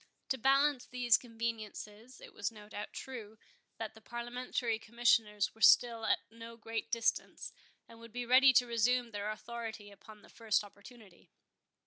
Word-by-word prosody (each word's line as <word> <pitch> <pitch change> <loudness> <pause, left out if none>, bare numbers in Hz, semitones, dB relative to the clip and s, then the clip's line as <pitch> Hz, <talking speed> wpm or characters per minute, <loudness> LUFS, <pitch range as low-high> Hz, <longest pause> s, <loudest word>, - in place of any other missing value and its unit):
To 265 - 0
balance 275 +2 +3
these 245 -3 +3
conveniences, 230 0 -6
it - - -13
was 205 +3 -3
no 210 -2 -13
doubt 210 0 -7
true, 220 -5 -8 0.4
that 225 -2 -5
the 220 - -16
Parliamentary 240 -1 -3
Commissioners 225 -3 +1
were 225 - -21
still 230 -2 +5
at - - +2
no 230 0 -11
great 225 0 -5
distance, 230 -1 -1 0.3
and 230 - -15
would 230 0 -13
be 245 +1 -4
ready 260 +2 +7
to 250 -1 +5
resume 240 +1 +1
their 205 0 -4
authority 220 -1 -7
upon 210 +1 -15
the - - -17
first 220 -2 0
opportunity. 205 -1 -16
230 Hz, 155 wpm, -33 LUFS, 215-245 Hz, 0.4 s, ready